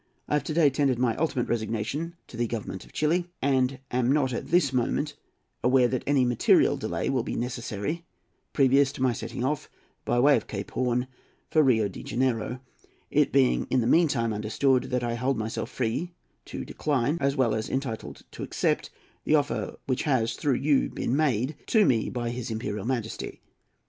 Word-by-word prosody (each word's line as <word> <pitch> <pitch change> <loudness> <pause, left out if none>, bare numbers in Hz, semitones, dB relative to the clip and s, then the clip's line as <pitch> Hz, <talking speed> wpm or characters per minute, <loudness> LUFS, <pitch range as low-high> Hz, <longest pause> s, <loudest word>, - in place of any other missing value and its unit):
I - - -2
have 150 -3 +2
to 155 - -2
day 155 -4 +5
tendered 135 -2 +1
my 120 -2 +1
ultimate 145 -5 0
resignation 120 +9 -2
to - - -13
the 120 +1 0
Government 110 -4 -5
of - - -18
Chili, 170 +3 +1
and 130 -1 +1
am 125 0 +2
not 135 -3 +2
at - - -4
this 165 -6 +3
moment 145 +4 0 0.5
aware 125 0 +5
that 125 0 -1
any 140 -3 +3
material 120 -1 +4
delay - - -3
will 135 -2 +1
be - - -4
necessary 120 +5 -3 0.5
previous 135 0 +4
to 130 - -3
my 130 -2 +3
setting 120 - -5
off, 145 +2 -1 0.3
by 120 - +1
way 140 +3 +6
of - - -2
Cape - - -5
Horn, 125 0 0 0.5
for 155 - +5
Rio 115 -7 +3
de 95 - -9
Janeiro; 125 +1 -1 0.5
it - - +3
being, 60 -1 +3
in 130 - +2
the - - -1
meantime, 125 -6 +3
understood 120 +5 +1
that 125 -1 -1
I 120 -1 -1
hold 125 +2 0
myself 110 +1 -3
free 140 +9 -2 0.3
to - - -6
decline, 145 +2 0
as 140 0 +1
well 125 -5 +2
as 110 0 -2
entitled 130 -4 -4
to - - -9
accept, - - -1 0.3
the 155 - +3
offer 145 -1 -1
which 130 -1 0
has, 125 -6 +1
through 140 -4 0
you, 140 +2 +2
been 125 - -2
made 140 -2 +1
to 215 -3 +4
me 115 -7 +2
by 120 -1 -3
his 120 -1 -5
Imperial 105 -2 -3
Majesty. 120 -4 -3
130 Hz, 185 wpm, -27 LUFS, 115-140 Hz, 0.5 s, way